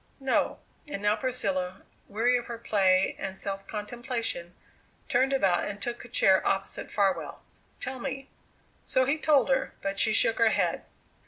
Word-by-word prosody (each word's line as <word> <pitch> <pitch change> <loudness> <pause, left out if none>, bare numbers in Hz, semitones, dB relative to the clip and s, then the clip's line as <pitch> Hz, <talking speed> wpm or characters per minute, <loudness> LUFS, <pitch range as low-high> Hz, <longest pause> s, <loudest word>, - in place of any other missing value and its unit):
"No." 270 -1 +1 0.3
And 205 -9 -5
now 210 +1 +3
Priscilla, 195 -7 -2 0.2
weary 235 +5 +2
of 240 - -10
her 235 - -5
play 190 -4 +2
and 190 -1 -4
self 195 0 -4
contemplation, 225 -5 -4 0.5
turned 260 +2 +2
about 195 -10 +2
and 205 0 -5
took 240 +2 -4
a - - -11
chair 190 -5 +4
opposite 195 0 -2
Farwell. 195 -2 0 0.4
"Tell 260 0 -4
me." 270 +1 -5 0.6
So 260 0 +2
he 290 +4 0
told 295 -3 +3
her, 265 -1 0
but 195 0 -2
she 220 - +4
shook 225 +2 +3
her 230 -1 +5
head. - - 0
220 Hz, 160 wpm, -28 LUFS, 195-255 Hz, 0.6 s, her